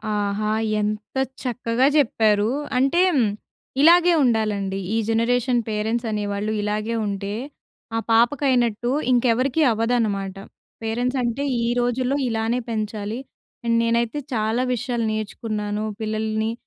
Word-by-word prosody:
ఆహా! 205 +1 -1 0.3
ఎంత 210 +2 -3 0.3
చక్కగా 250 +1 +1
చెప్పారు. 220 -5 +3 0.3
అంటే 275 +7 +3 0.8
ఇలాగే 345 +3 +6
ఉండాలండి. 210 -5 0 0.2
ఈ - - +2
జనరేషన్ 245 +2 +2
పేరెంట్స్ 220 +2 -1
అనేవాళ్ళు 205 0 -2
ఇలాగే 210 +2 -2
ఉంటే 200 0 -3 0.6
ఆ - - +2
పాపకైనట్టు, 240 -1 +2 0.2
ఇంకెవరికీ 250 +4 +2
అవ్వదన్నమాట. 215 -4 0 0.5
పేరెంట్స్ 245 +4 -1
అంటే 240 +4 -1 0.2
ఈ - - 0
రోజుల్లో 250 +2 0
ఇలానే 225 +2 0
పెంచాలి. 215 +1 -3 0.5
అండ్ 230 0 +2
నేనైతే 235 +4 0
చాలా 220 +2 0
విషయాలు 240 -1 -2
నేర్చుకున్నాను. 215 -1 -3 0.2
పిల్లల్ని 220 0 -1
225 Hz, 105 wpm, -23 LUFS, 215-245 Hz, 0.8 s, ఇలాగే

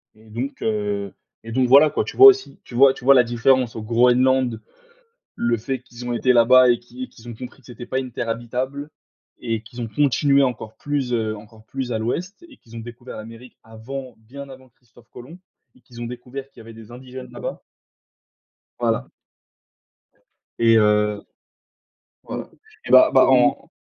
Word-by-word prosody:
et 110 0 -20
donc 125 +6 -6
heu, 105 -2 -2 0.3
et 115 - -9
donc 130 +2 +1
voilà 140 +4 +7
quoi - - -1
tu - - -8
vois? 400 - +11
Aussi, 400 0 +3
tu 120 - -12
vois 135 +2 +6
tu - - -14
vois? 140 +1 +7
La 125 - +6
différence 120 +1 +1
au 110 - -5
Groenland, 125 +1 +2 0.8
le 120 0 0
fait 130 +4 -4
qu'ils 120 -1 -11
ont 120 - -2
été 125 +2 +2
là-bas 125 +1 +6
et 120 - +2
qu'ils 125 +1 -9
qu'ils 120 +1 -15
ont 120 - -7
compris 125 +4 -10
que 125 - -23
c'était 120 0 -10
pas 130 - -2
une 130 -2 -5
terre 115 - -4
habitable, 130 +5 -4 0.5
et 115 -2 -3
qu'ils 120 +2 -11
ont 115 - -4
continué 140 +2 +2
encore 120 -4 -3
plus, 145 -4 -3
heu, 110 -2 -1
encore 110 +1 -16
plus 130 0 -5
à 110 - -1
l'ouest 175 - -4
et 280 - -17
qu'ils 115 0 -15
ont - - -6
découvert 120 +2 -10
l'Amérique 115 +3 -12
avant, 125 +3 -9
bien 140 +6 -11
avant 130 0 -14
Christophe 120 0 -24
Colomb 140 +9 -12 0.4
et - - -24
qu'ils 120 -1 -14
ont - - -4
découvert 125 +3 -8
qu'il - - -17
y - - -10
avait 115 0 -13
des 110 0 -14
indigènes 130 +1 -10
là-bas. - - -7 1.2
Voilà. - - -1 1.5
Et 115 -1 +5
heu, 105 -1 +2 1.0
voilà, - - -7 0.4
et - - -5
bah, - - +7
bah - - +6
en - - +3
120 Hz, 185 wpm, -21 LUFS, 115-130 Hz, 1.5 s, vois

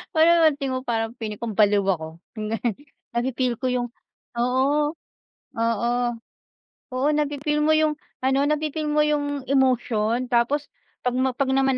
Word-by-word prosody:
Parang 335 +2 +6
alam - - -6 0.2
mo - - -1
parang 225 -1 -2
feeling 215 -3 -6
ko 225 -4 -4
baliw 205 -2 +4
ako. 160 -3 -2 0.2
Yung 215 -1 -4
ganun. 230 -3 -1 0.4
Na-fi-feel 250 0 0
ko 260 - -6
yung 245 -1 0 0.5
oo 265 +5 +2 0.7
oo 230 0 +1 1.0
oo 260 +3 +1
na-fi-feel 295 0 0
mo 310 - +3
yung 310 -1 +3 0.3
ano, 270 +1 +3
na-fif 305 0 -1
eel 305 -1 -1
mo 300 - +2
yung 290 -2 -1
emotion 250 -3 +2
tapos 275 +5 +2 0.4
'pag 250 0 0
ma 260 0 +2
'pag 265 0 0
naman 270 -1 +2
255 Hz, 155 wpm, -24 LUFS, 230-290 Hz, 1.0 s, Parang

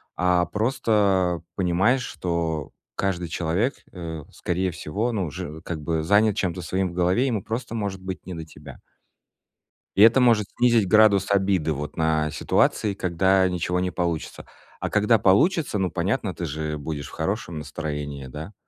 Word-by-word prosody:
а 90 -1 +2
просто 100 -3 +1
понимаешь, 95 +8 +2
что 85 - -3 0.2
каждый 90 -3 -1
человек, 85 - 0 0.2
э, 80 -4 -6
скорее 90 +2 -1
всего, 100 +8 -2
ну, 100 -5 -1
уже 80 0 -7
как 85 -3 -5
бы 80 +1 -1
занят 100 +4 +3
чем-то 90 -1 -2
своим 95 +3 -1
в - - -11
голове, 90 +8 +2
ему 115 -7 -1
просто 115 +1 -4
может 100 -4 -3
быть 95 0 -6
не 90 - -5
до 80 - -6
тебя. 75 -3 -13 1.2
И 100 - +8
это 115 +4 +7
может 115 -4 +4
снизить 115 -5 +4
градус 105 -1 +5
обиды 95 -5 +2
вот 75 +1 -6
на 80 -1 +1
ситуации, 100 +6 +1
когда 95 0 +2
ничего 90 0 -1
не 90 0 0
получится. 85 -3 -3 0.3
А - - -3
когда 105 +2 +4
получится, 110 - +3
ну, 95 -1 +1
понятно, 95 +3 -1
ты 85 - -4
же 75 0 -3
будешь 75 -1 -5
в - - -13
хорошем 85 -1 -3
настроении, 75 -2 -5
да? 80 +10 -8
90 Hz, 160 wpm, -24 LUFS, 80-105 Hz, 1.2 s, И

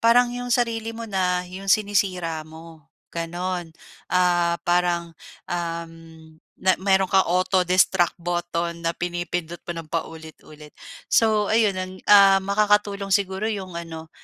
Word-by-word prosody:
parang 240 +1 +4
yung 245 0 -5
sarili 230 -2 0
mo 230 - -6
na, 180 -2 0
yung 195 +2 -9
sinisira 185 -6 +1
mo, 160 -2 -14 0.2
gano'n. 175 0 -4 0.4
Ah, 175 -1 +2
parang, 175 -1 +1 0.4
uhm, 165 -2 -6 0.2
na 185 0 +3
meron 190 -1 +3
kang 190 -1 +4
auto-destruct 185 0 +2
botton 170 -1 -3
na 165 - +2
pinipindot 175 -1 -4
mo 175 - -4
ng 160 - -9
paulit-ulit. 160 -2 -7 0.3
So, 215 -2 +3
ayun 220 -3 +3
ang 185 0 -4 0.2
ah, 195 -1 +8
makakatulong 205 0 +1
siguro 195 +1 0
yung 190 -5 -5
ano, 160 -1 -8
180 Hz, 125 wpm, -23 LUFS, 170-200 Hz, 0.4 s, ah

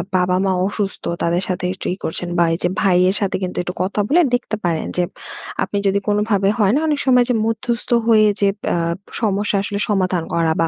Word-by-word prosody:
বাবা-মা 185 +1 +2 0.2
অসুস্থ, 200 -1 -3 0.2
তাদের 175 +3 +1
সাথে 180 -1 -2
একটু 190 - -7
ই - - -4
করছেন, 175 +2 -4
বা 170 - +5
এই - - -1
যে 175 - +2
ভাইয়ের 185 0 +3
সাথে 195 - 0
কিন্তু 180 - -4
একটু 180 - -4
কথা 200 +2 -2
বলে 345 +4 +4
দেখতে 245 -3 -3
পারেন, 165 -2 0
যে 180 - +3 0.6
আপনি 205 - -3
যদি 200 +1 +2
কোনভাবে 205 -1 +2
হয় 205 0 +3
না - - +3
অনেক 295 -2 +1
সময়, 250 -2 +5
যে - - +3
মধ্যস্থ 230 +1 -2 0.2
হয়ে 215 -2 +5
যে 200 - +4
ব - - -56
অ্যা - - +1 0.4
সমস্যা 205 -1 0
আসলে 205 0 -3
সমাধান 185 -4 +1
করা, 165 -1 +2
বা 165 - +3
195 Hz, 210 wpm, -19 LUFS, 180-215 Hz, 0.6 s, বা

